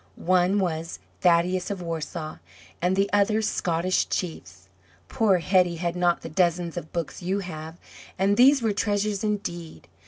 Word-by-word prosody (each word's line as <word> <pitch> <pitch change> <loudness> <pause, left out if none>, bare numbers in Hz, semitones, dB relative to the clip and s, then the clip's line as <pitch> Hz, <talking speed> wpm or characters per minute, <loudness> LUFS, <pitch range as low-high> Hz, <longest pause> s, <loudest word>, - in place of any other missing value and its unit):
One 185 +2 +2
was 165 -4 -2 0.2
"Thaddeus 180 +1 +2
of 200 -2 -3
Warsaw," 160 -2 -5 0.4
and 180 +2 +2
the 195 +1 +2
other 205 +1 +3
"Scottish 185 -3 0
Chiefs." 95 - -5 0.4
Poor 205 -4 +3
Hetty 180 0 +2
had 170 +1 -2
not 175 -1 +1
the - - -5
dozens 170 0 0
of 155 - -6
books 170 -1 -4
you 190 +3 -1
have, 160 -2 -8 0.4
and 195 +2 +2
these 265 +2 +5
were 220 -2 +1
treasures 205 0 -1
indeed. 175 -6 -4
180 Hz, 150 wpm, -25 LUFS, 170-200 Hz, 0.4 s, these